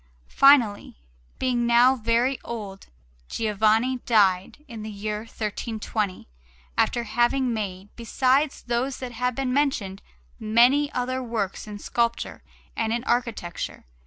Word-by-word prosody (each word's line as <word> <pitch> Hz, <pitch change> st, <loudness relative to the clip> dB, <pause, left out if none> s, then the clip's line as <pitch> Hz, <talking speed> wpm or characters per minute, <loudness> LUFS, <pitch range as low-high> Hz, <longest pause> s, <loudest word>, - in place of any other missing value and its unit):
Finally, 250 Hz, -, +4 dB, 0.4 s
being 245 Hz, -2 st, 0 dB
now 240 Hz, +2 st, +5 dB
very 235 Hz, +3 st, 0 dB
old, 205 Hz, -4 st, -7 dB, 0.4 s
Giovanni 220 Hz, +4 st, +1 dB
died 200 Hz, +5 st, +2 dB
in 230 Hz, -4 st, -8 dB
the 215 Hz, -, -6 dB
year 210 Hz, 0 st, -4 dB
1320, 215 Hz, -2 st, -4 dB, 0.5 s
after 240 Hz, -, +1 dB
having 240 Hz, +3 st, +1 dB
made, 200 Hz, -2 st, -5 dB
besides 265 Hz, +5 st, +1 dB
those 245 Hz, +3 st, -1 dB
that 255 Hz, -2 st, -6 dB
have 250 Hz, +1 st, -2 dB
been 260 Hz, -1 st, -1 dB
mentioned, 240 Hz, -9 st, 0 dB, 0.4 s
many 245 Hz, +7 st, +3 dB
other 255 Hz, +1 st, -2 dB
works 220 Hz, -5 st, -3 dB
in 210 Hz, -1 st, -7 dB
sculpture 235 Hz, +3 st, -2 dB, 0.3 s
and 225 Hz, -1 st, -1 dB
in 235 Hz, +1 st, -1 dB
architecture. 230 Hz, -9 st, -3 dB
235 Hz, 120 wpm, -25 LUFS, 215-255 Hz, 0.5 s, now